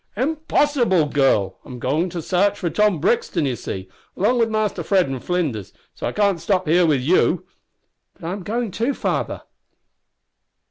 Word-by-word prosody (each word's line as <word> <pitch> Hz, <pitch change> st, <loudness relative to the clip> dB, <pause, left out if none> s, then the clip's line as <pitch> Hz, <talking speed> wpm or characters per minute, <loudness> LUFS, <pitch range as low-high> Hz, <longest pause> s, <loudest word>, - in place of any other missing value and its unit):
"Impossible, 280 Hz, -, +2 dB
girl! 135 Hz, -9 st, +1 dB
I'm 125 Hz, -3 st, -9 dB
going 160 Hz, +8 st, 0 dB
to 170 Hz, -1 st, -5 dB
sarch 200 Hz, +4 st, +1 dB
for 170 Hz, -3 st, -2 dB
Tom 210 Hz, -5 st, +2 dB
Brixton, 170 Hz, -2 st, +1 dB
you 130 Hz, -3 st, -1 dB
see, 95 Hz, -4 st, -6 dB, 0.3 s
along 240 Hz, +6 st, +2 dB
with 230 Hz, -1 st, +2 dB
Mister 215 Hz, -4 st, -1 dB
Fred 185 Hz, +1 st, +2 dB
an' 135 Hz, -1 st, -4 dB
Flinders, 145 Hz, -, -2 dB, 0.2 s
so -, -, -4 dB
I -, -, -2 dB
can't 200 Hz, -5 st, +1 dB
stop 185 Hz, -4 st, 0 dB
here 170 Hz, +2 st, +4 dB
with 145 Hz, -5 st, +2 dB
you." 160 Hz, +8 st, +2 dB, 0.7 s
"But 165 Hz, -, -9 dB
I -, -, -2 dB
am 195 Hz, +1 st, -4 dB
going 225 Hz, +3 st, -2 dB
too, 235 Hz, +8 st, -1 dB
father!" -, -, -2 dB
180 Hz, 170 wpm, -21 LUFS, 150-210 Hz, 0.7 s, here